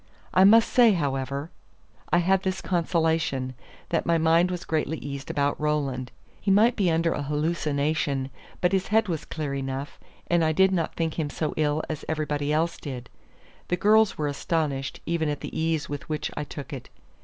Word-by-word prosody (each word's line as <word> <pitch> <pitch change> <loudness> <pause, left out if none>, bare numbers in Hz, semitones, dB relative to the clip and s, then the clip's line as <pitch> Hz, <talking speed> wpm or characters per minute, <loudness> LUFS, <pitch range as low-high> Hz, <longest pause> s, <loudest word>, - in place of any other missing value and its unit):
I 185 +1 +6
must 225 +3 +7
say, 235 -4 +5
however, 140 -1 -2 0.6
I - - +5
had 185 +2 +3
this 190 0 -2
consolation, 160 -6 0 0.4
that 165 - +1
my 170 -1 +2
mind 165 +2 +4
was 180 -1 -4
greatly 160 0 -1
eased 140 -1 -7
about 145 +1 0
Roland. 140 -4 -1 0.3
He - - -1
might 220 +5 +5
be 195 -5 +2
under 165 0 +2
a - - -3
hallucination; 150 -2 -1 0.3
but 180 - +3
his 190 -1 +1
head 220 +1 +3
was 165 -4 -3
clear 150 -3 -4
enough, 135 +1 -4 0.3
and 175 -1 +2
I 160 0 +2
did 190 +4 +4
not 170 -4 -1
think 165 -1 -2
him 150 -2 -1
so 155 +1 -2
ill 155 0 +1
as 155 -2 -5
everybody 150 -2 -1
else 165 +2 +1
did. 125 -4 -7 0.6
The 180 - 0
girls 215 +2 +4
were 150 - -1
astonished 145 -2 -2
even 165 -2 0
at 145 - -3
the - - -7
ease 160 -1 0
with 145 0 -6
which 155 -1 -2
I 150 - -3
took 145 +1 -8
it. 130 - -7
160 Hz, 185 wpm, -26 LUFS, 145-175 Hz, 0.6 s, must